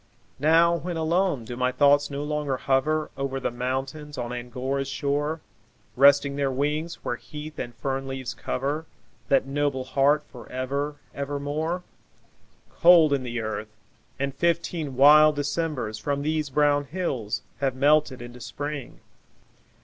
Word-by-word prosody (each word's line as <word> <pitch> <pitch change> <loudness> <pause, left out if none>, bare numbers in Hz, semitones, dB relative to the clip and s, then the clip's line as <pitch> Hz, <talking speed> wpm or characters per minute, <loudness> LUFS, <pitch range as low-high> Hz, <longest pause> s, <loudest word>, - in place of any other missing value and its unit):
Now, 165 +3 +4
when 175 0 -4
alone, 165 -5 +1
do 120 - -6
my 125 +1 +1
thoughts 145 +2 +4
no 140 0 -4
longer 150 -3 -1
hover 150 +4 +1
Over 135 -1 -2
the 130 - -2
mountains 135 +4 -4
on 120 -1 -4
Angora's 125 +3 -3
shore, 145 +3 -1 0.5
Resting 140 +1 +5
their 140 -1 +1
wings, 150 +5 -1
where 120 - -1
heath 150 +7 -9
and 120 0 -5
fern 135 +2 -3
leaves 135 -2 -4
cover 145 +5 -3 0.4
That 135 -1 +3
noble 140 -1 -1
heart 140 +3 +2
for 120 -2 -13
ever, 140 +3 -2 0.2
ever 140 +1 -3
more? 155 +5 -2 0.9
Cold 170 -4 +6
in 140 - +1
the 120 -2 -3
earth, 110 0 -5 0.4
and 140 0 -2
fifteen 165 -2 -1
wild 150 +2 +7
Decembers 145 -7 -2
From 140 +4 -2
these 155 -1 -1
brown 145 +1 +2
hills 130 - -3 0.2
have 135 -2 0
melted 145 -2 +2
into 120 0 -10
Spring. 145 0 -6
140 Hz, 140 wpm, -25 LUFS, 130-150 Hz, 0.9 s, wild